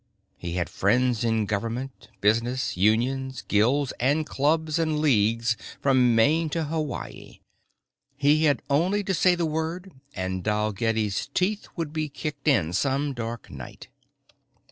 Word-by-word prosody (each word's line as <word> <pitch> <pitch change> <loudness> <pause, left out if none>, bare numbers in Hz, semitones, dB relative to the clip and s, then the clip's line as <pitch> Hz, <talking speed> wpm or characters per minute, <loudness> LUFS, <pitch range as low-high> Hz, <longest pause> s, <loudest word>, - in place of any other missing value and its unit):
He 85 -1 -6
had 90 -1 -1
friends 125 +3 +1
in 115 -2 +1
government, 115 +6 -4
business, 115 +6 +1
unions, 125 +7 +1
guilds 125 +7 +2
and 145 +5 +2
clubs 155 +3 0
and 155 -2 0
leagues 115 -5 +2 0.2
from 130 -4 +3
Maine 155 +8 +3
to 165 +1 -1
Hawaii. 150 - -5 0.8
He 145 +2 +3
had 145 -2 +2
only 180 +9 +1
to 195 - -1
say 180 0 +4
the 170 -1 -1
word 160 +4 -3 0.2
and 95 -1 -3
Dalgetty's 105 0 0
teeth 200 +3 0
would 165 -3 -4
be 155 -1 -2
kicked 145 0 -6
in 95 - +3
some 135 +8 0
dark 115 -1 -6
night. 65 -4 -10
130 Hz, 135 wpm, -25 LUFS, 110-155 Hz, 0.8 s, say